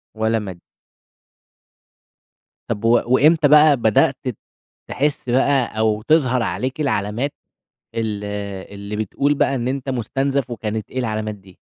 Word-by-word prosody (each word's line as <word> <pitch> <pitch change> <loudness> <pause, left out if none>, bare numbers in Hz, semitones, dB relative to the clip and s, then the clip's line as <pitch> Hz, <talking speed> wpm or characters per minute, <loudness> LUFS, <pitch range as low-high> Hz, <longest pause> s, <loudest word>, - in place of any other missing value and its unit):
والّا 110 +1 +1
مادي. 95 -5 -8 2.1
طَب 105 +2 -3
و 115 +1 +5
وإمتى 145 +5 +4
بقى 150 0 +6
بدأت 110 -3 +3 0.7
تحِس 140 -2 -1
بقى 130 -2 +1
أو 110 -1 +1
تظهر 130 -6 +3
عليك 130 - -3
العلامات 120 +1 -1 0.6
ال 110 -3 -2 0.5
اللي 100 +1 -6
بتقول 110 +7 0
بقى 140 -1 +1
إن 120 -1 -2
أنت 135 +1 -3
مُستنزَف 135 +2 -1
وكانت 110 -2 -4
إيه 130 - -4
العلامات 110 -3 -2
دي؟ 95 -2 -19
120 Hz, 125 wpm, -20 LUFS, 110-135 Hz, 2.1 s, بقى